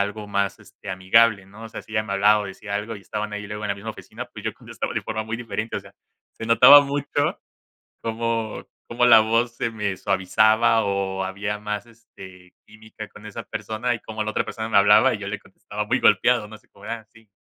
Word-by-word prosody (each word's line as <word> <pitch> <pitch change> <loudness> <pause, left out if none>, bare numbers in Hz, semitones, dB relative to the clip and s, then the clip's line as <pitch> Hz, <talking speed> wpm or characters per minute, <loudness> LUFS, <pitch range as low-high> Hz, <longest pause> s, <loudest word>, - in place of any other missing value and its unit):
algo 105 +1 -5
más, 100 0 -1
este, 105 0 -15
amigable, 100 +3 +3
¿no? 110 +3 -12
O - - -8
sea, - - -8
si 110 - -16
ella 110 -1 +1
me 100 -2 -4
hablaba 105 +2 +4
o 100 - -4
decía 100 +1 -7
algo 105 +2 -3
y 100 - -14
estaban 105 +1 -4
ahí 105 0 -5
luego 105 +1 -6
en - - -3
la 100 - 0
misma 105 +3 -7
oficina, - - -9
pues, - - -11
yo - - -2
contestaba - - -6
de - - -1
forma 110 0 -3
muy 110 +1 -4
diferente, 115 -1 -4
o - - -3
sea, - - -17 0.4
se 115 - -8
notaba 140 +5 +9
mucho 145 +1 -1 0.6
cómo 115 -1 -3 0.2
cómo 120 +1 +1
la 115 -2 +8
voz 115 +2 0
se 115 - -2
me 105 -3 -2
suavizaba 110 +4 +3
o 95 -1 -1
había 100 +2 -3
más, 105 +1 -4
este, 95 -6 -15
química 110 0 -11
con 105 - -15
esa 105 - -7
persona 115 +2 -3
y - - -9
como 110 0 -4
la 110 - -3
otra - - 0
persona 110 0 -5
me 110 - +3
hablaba 105 +2 +6
y - - -4
yo 100 - -6
le 100 0 -4
contestaba 105 +2 -7
muy 125 +4 +1
golpeado 120 -4 +4
no 110 - -10
sé, 105 - -30
como - - -16
de: - - -5
"Ah, 110 -2 -6
sí". 110 -2 -21
110 Hz, 235 wpm, -23 LUFS, 100-115 Hz, 0.6 s, notaba